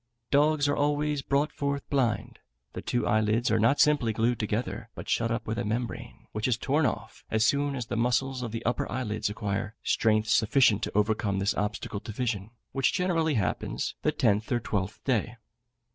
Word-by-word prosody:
Dogs 145 +1 +3
are 145 - +2
always 145 0 +1
brought 140 +3 +1
forth 140 -1 -3
blind; 125 -6 0 0.3
the - - -5
two 120 - -1
eyelids 110 +2 +2
are 110 - +3
not 115 +6 +3
simply 145 -7 +4
glued 115 +2 +1
together, 110 +1 -2
but - - -8
shut 115 0 +1
up 115 0 -2
with 110 +2 -2
a - - -1
membrane, 115 +2 -4
which 110 +2 -1
is 120 -3 +2
torn 145 +3 +2
off, - - -5
as 110 0 +2
soon 140 +3 +1
as 125 -3 -3
the - - -4
muscles 125 +2 +1
of 120 -3 -4
the 115 +1 -5
upper 120 - -1
eyelids 110 -5 -2
acquire 105 0 -3
strength 110 -1 +2
sufficient 110 -1 +4
to 105 - -2
overcome 105 -2 +1
this 100 +1 +1
obstacle 105 0 -3
to 110 - -8
vision, 110 -3 -2 0.2
which 135 -1 +1
generally 165 -4 +1
happens 105 - -1
the - - +2
tenth 105 +2 +1
or 120 - +2
twelfth 105 -3 -3
day. 120 -3 0
115 Hz, 190 wpm, -28 LUFS, 110-135 Hz, 0.3 s, simply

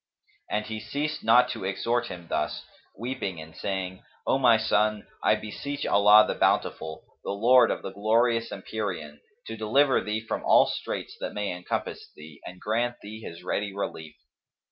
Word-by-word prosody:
And 105 0 -1
he 110 0 -5
ceased 145 +7 -3
not 120 +3 +6
to 115 -6 -5
exhort 115 +5 0
him 85 -1 -8
thus, 75 -1 -2 0.3
weeping 110 -6 -4
and 80 0 -11
saying, 95 -1 -4 0.2
"O 135 - +2
my 120 -4 +6
son, 110 -1 +1 0.2
I - - +5
beseech 140 +7 -5
Allah 105 +1 +7
the - - 0
Bountiful, 80 0 0 0.2
the - - -5
Lord 120 +6 +5
of - - -2
the 95 - -5
glorious 115 +3 +2
Empyrean[FN#260] 85 -9 -5 0.3
to 110 - -6
deliver 130 +6 +3
thee 105 +1 -2
from - - -3
all - - +6
straits - - -4
that - - -5
may 105 -1 -2
encompass 90 0 -4
thee 75 -1 -13
and 90 0 -10
grant 120 +4 0
thee 110 +2 -8
His 85 -4 -9
ready 100 +2 -2
relief!" 80 -6 -5
105 Hz, 165 wpm, -27 LUFS, 95-115 Hz, 0.3 s, Allah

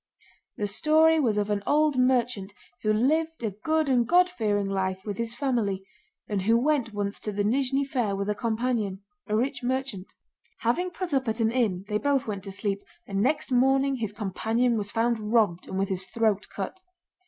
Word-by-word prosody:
The 210 - -1
story 315 +9 +4
was 230 -8 +1
of 210 0 0
an 205 -1 0
old 300 -1 +3
merchant 245 -6 +1 0.3
who 215 - +1
lived 310 +7 +1
a 220 - 0
good 315 +10 0
and 245 -3 +2
God 360 +3 +4
fearing 205 - 0
life 190 -1 -2
with 205 -2 -4
his 230 0 -2
family, 225 -8 -1 0.4
and 205 -2 -1
who 225 +4 +3
went 265 -2 +1
once 205 -1 -3
to 210 - -3
the 205 0 -1
Nízhni 270 +5 +1
fair 245 -8 -1
with 200 0 -3
a 210 - +1
companion—a 220 +1 -2
rich 265 +4 -1
merchant. 255 -6 -3 0.5
Having 295 +11 +1
put 355 -1 -5
up 265 -2 +1
at 220 +2 -1
an 225 0 +2
inn 210 -7 0
they 210 0 0
both 280 0 +1
went 200 -3 -4
to 195 - -6
sleep, 200 0 -2 0.2
and 195 0 -2
next 290 +4 0
morning 270 +2 +3
his 220 -4 -3
companion 220 +4 0
was 205 -2 -2
found 230 +1 +1
robbed 210 -5 +1
and 190 - -4
with 195 0 0
his 190 0 -1
throat 220 -3 0
cut. 205 - -5
225 Hz, 190 wpm, -27 LUFS, 205-270 Hz, 0.5 s, story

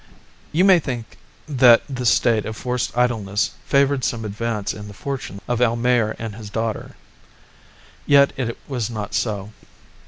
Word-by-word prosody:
You 175 +5 +3
may 190 -3 +7
think 125 -7 -6 0.3
that 125 -5 +6
this 125 -4 0
state 110 -2 +2
of 110 -1 -6
forced 125 -1 -3
idleness 110 -5 +1 0.2
favoured 140 -1 +2
some 115 -2 -2
advance 105 0 -3
in 105 -1 -9
the 100 - -11
fortunes 130 -6 -5
of 120 0 -1
Almayer 120 -1 +2
and 115 -2 -5
his 105 0 -9
daughter. 110 0 -3 1.1
Yet 140 -1 +5
it 120 -3 -3
was 125 -6 -2
not 105 -3 -5
so. 105 -2 -2
115 Hz, 150 wpm, -21 LUFS, 110-125 Hz, 1.1 s, may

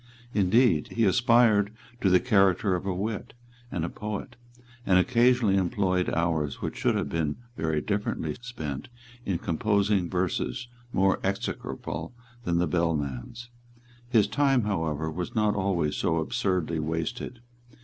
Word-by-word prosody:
Indeed 100 -3 +3
he 115 -1 +2
aspired 110 -1 +4 0.3
to 95 - +3
the 90 0 +6
character 100 -4 +3
of 90 +2 -2
a 95 - 0
wit 105 +4 -4 0.4
and 85 -3 -1
a - - -3
poet, 105 +3 -5 0.5
and 95 -5 +4
occasionally 120 0 +4
employed 90 0 +1
hours 80 -4 0
which - - -4
should - - +1
have - - -1
been 80 -3 -1 0.2
very 80 -6 -1
differently 105 +3 -2
spent 80 - -6 0.4
in 95 -3 +1
composing 100 +1 +1
verses 95 +6 -2 0.2
more 95 -2 +2
execrable 95 -2 -4 0.3
than 85 -4 +1
the 90 - +3
bellman's. 85 - -2 0.6
His 115 -5 +4
time 135 +3 +2
however 80 -6 -1
was 90 +9 -5
not 105 -1 +3
always 90 -6 0
so 80 - +1
absurdly 90 -3 0
wasted. 80 +10 -3
95 Hz, 135 wpm, -27 LUFS, 85-110 Hz, 0.6 s, the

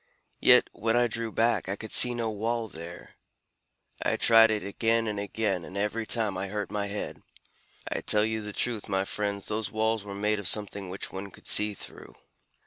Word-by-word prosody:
Yet - - +6
when 115 +2 0
I 120 - +4
drew 115 -1 -3
back, 115 -3 +1
I 100 - -1
could 110 +1 -9
see 125 0 +7
no 115 -2 -2
wall 115 +2 -2
there. 85 -2 -10 0.8
I - - 0
tried 115 -1 +6
it 105 -2 -1
again 115 +3 0
and 105 -1 -3
again, 100 -3 -2
and 95 - -8
every 105 +2 -2
time 105 -5 0
I 95 - -3
hurt 105 0 -4
my 105 -1 -2
head. 100 +1 -5 0.7
I - - -3
tell 105 0 +4
you 110 0 -2
the 105 0 -6
truth, 110 0 -2
my 95 0 0
friends, 100 -1 -3
those 110 -1 -2
walls 110 -1 0
were 100 -1 -8
made 105 +1 0
of 100 - 0
something 100 -2 0
which 95 +2 -5
one 95 +1 -6
could - - -18
see 105 0 +4
through." - - -11
105 Hz, 200 wpm, -28 LUFS, 100-110 Hz, 0.8 s, see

